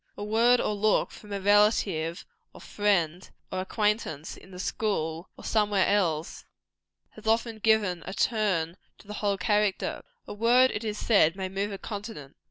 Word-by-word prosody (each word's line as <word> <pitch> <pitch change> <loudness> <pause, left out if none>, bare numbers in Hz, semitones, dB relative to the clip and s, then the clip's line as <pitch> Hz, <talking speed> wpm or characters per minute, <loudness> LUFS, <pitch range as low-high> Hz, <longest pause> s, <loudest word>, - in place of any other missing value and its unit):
A - - -5
word 230 +4 +4
or - - 0
a - - -1
look 210 +1 +1
from 210 - -13
a 200 - -2
relative, 195 -5 +2 0.3
or - - -12
friend, 185 -4 0 0.2
or 185 - -2
acquaintance, 210 -7 -1
in - - -16
the 185 - -11
school 175 -4 -2
or - - -12
somewhere 205 -3 +2
else, 170 -6 0 0.7
has 215 0 -12
often 225 0 +1
given 210 -5 +2
a - - -4
turn 190 -8 0 0.2
to - - -18
the 210 - -8
whole 200 -1 +1
character. 205 +1 0 0.2
A - - -7
word, 240 +4 +4
it 210 - -4
is 210 -1 -3
said, 190 -8 +3
may 190 -1 -4
move 200 +2 -2
a 195 - -5
continent. 200 -10 -8
205 Hz, 175 wpm, -27 LUFS, 185-215 Hz, 0.7 s, word